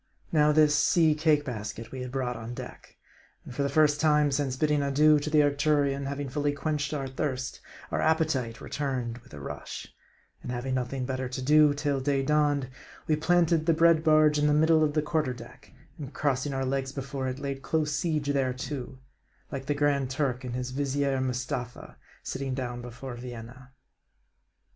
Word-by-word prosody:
Now 150 -2 +4
this 150 -1 +5
sea 160 +1 +4
cake 150 -1 +2
basket 115 -2 -6
we 130 - -6
had 125 -1 -5
brought 125 -2 -2
on 115 +1 -7
deck. - - -10 0.5
And - - -9
for 140 - -2
the 140 - +1
first 150 -1 +3
time 150 -2 +3
since 135 -2 0
bidding 150 0 +2
adieu 150 +2 +4
to 145 - -3
the 150 -1 +5
Arcturion 145 -1 +1
having 140 0 -3
fully 145 +2 -1
quenched 145 0 -2
our 140 -3 -3
thirst, 130 -1 -3 0.3
our - - 0
appetite 155 -8 0
returned 125 -5 -3
with 120 - -21
a - - -8
rush; 70 - -7 0.5
and - - -6
having 125 +2 -3
nothing 130 0 -2
better 130 -1 -3
to 130 +1 -4
do 150 +1 +5
till 145 -1 0
day 135 0 0
dawned, 145 -2 +2 0.4
we 155 - +2
planted 165 0 +2
the 165 - +4
bread 165 -1 +4
barge 155 -2 +5
in 150 - +3
the 150 - +3
middle 160 +1 +4
of 150 -1 +1
the 155 -1 +1
quarter 150 -4 0
deck; 120 -1 -13 0.3
and 145 -2 -8
crossing 145 -1 0
our 135 -1 -1
legs 135 0 -1
before 135 -1 -4
it, 130 0 -3
laid 140 -1 -4
close 155 +1 0
seige 150 -2 0
thereto, 130 0 -3 0.5
like 135 -1 -5
the 145 - +1
Grand 145 -2 +1
Turk 130 -2 -1
and 125 -1 -4
his 125 0 -3
Vizier 140 0 0
Mustapha 125 -1 -4 0.3
sitting 135 -1 -3
down 120 -2 -4
before 120 +2 -8
Vienna. 120 +1 -9
140 Hz, 180 wpm, -28 LUFS, 130-150 Hz, 0.5 s, this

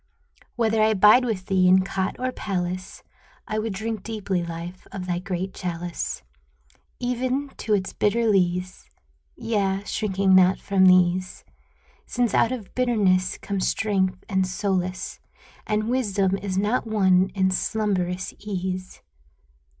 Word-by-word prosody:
Whether 225 -2 +1
I 215 0 +3
bide 210 +6 +6
with 205 -6 -2
thee 185 -2 +3
in 185 +1 +5
cot 190 0 -2
or 255 0 -2
palace, 185 -5 -4 0.4
I 215 0 -1
would 220 -1 -2
drink 220 +1 -3
deeply. 200 -4 -2
Life, 170 +2 -7
of 190 -2 -6
thy 175 -1 -1
great 185 0 -4
chalice, 175 -1 -4 0.8
Even 255 +3 -1
to 215 - +1
its 190 -1 -3
bitter 230 +3 +1
lees 180 -2 0 0.2
— - - -42
Yea, 205 -4 -1
shrinking 195 -3 +1
not 185 0 +6
from 195 -1 +2
these, 185 0 +3 0.6
Since 240 -4 0
out 230 - +3
of 235 -7 -6
bitterness 200 -7 +2
come 200 -1 -4
strength 190 -2 0
and 190 -3 +1
solace 185 -1 -2 0.5
And 215 0 0
wisdom 205 -6 +1
is 190 -1 -4
not 210 +5 0
won 190 -3 +3
in 190 -1 +2
slumberous 185 -3 -1
ease. 185 -2 -5
195 Hz, 135 wpm, -24 LUFS, 185-215 Hz, 0.8 s, bide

